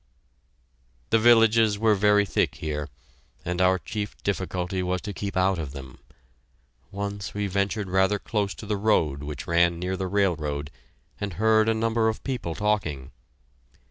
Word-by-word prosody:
The 115 - +5
villages 115 -2 +5
were 110 0 +3
very 105 0 +4
thick - - 0
here, 75 -1 -4 0.6
and 90 +1 -1
our 95 0 +4
chief 105 +2 -5
difficulty 95 -1 -2
was 90 0 -1
to 105 - -6
keep 100 +1 -4
out 95 -1 +2
of 75 -4 -5
them. 65 -2 -10 0.9
Once 100 -1 -5
we 105 0 -1
ventured 100 +1 -1
rather 95 +2 +2
close 100 -1 -2
to - - -9
the 105 0 -1
road 80 -10 +1
which 75 -1 -6
ran 85 0 +2
near 90 +2 -2
the 95 0 -3
railroad, 75 -7 -1 0.5
and 100 -2 -4
heard 110 +2 +3
a 115 - +2
number 115 0 +1
of 110 - -5
people 120 -12 -3
talking. 100 -11 -1
100 Hz, 155 wpm, -25 LUFS, 85-105 Hz, 0.9 s, The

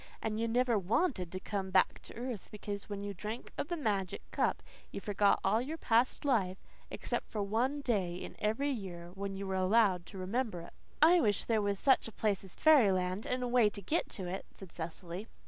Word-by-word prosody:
And 215 0 -2
you 230 - +1
never 240 -1 +2
WANTED 195 - 0
to 185 - -4
come 195 -1 -3
back 185 0 +3
to - - -10
earth, 240 -4 -5
because 205 -1 -6
when 200 -1 -4
you 200 0 -4
drank 215 +5 -6
of - - -3
the 345 - -2
magic 205 - -1
cup - - 0 0.3
you - - -5
forgot 205 0 +2
all 215 +4 +3
your 300 +6 -4
past 240 0 +2
life, 195 -9 +2 0.3
except - - -3
for 210 -2 -2
one 245 +8 0
day 200 -10 0
in 180 - -7
every 225 +7 0
year 175 -7 -6
when 195 0 -4
you 200 - -4
were 190 - -3
allowed 190 -2 +3
to 195 - -10
remember 195 0 -2
it." 170 - -12 0.3
"I 345 +2 +7
wish 205 -3 +1
there 225 -2 +2
was 200 -1 0
such 265 +3 +3
a - - -8
place 205 -3 0
as 190 - -9
fairyland 200 -10 +4
and 250 0 -1
a - - 0
way 240 -3 +4
to 205 - -8
get 300 - -1
to 190 - -4
it," 185 +2 -5
said 190 -4 -11
Cecily. 170 +4 -6
205 Hz, 215 wpm, -33 LUFS, 190-240 Hz, 0.3 s, I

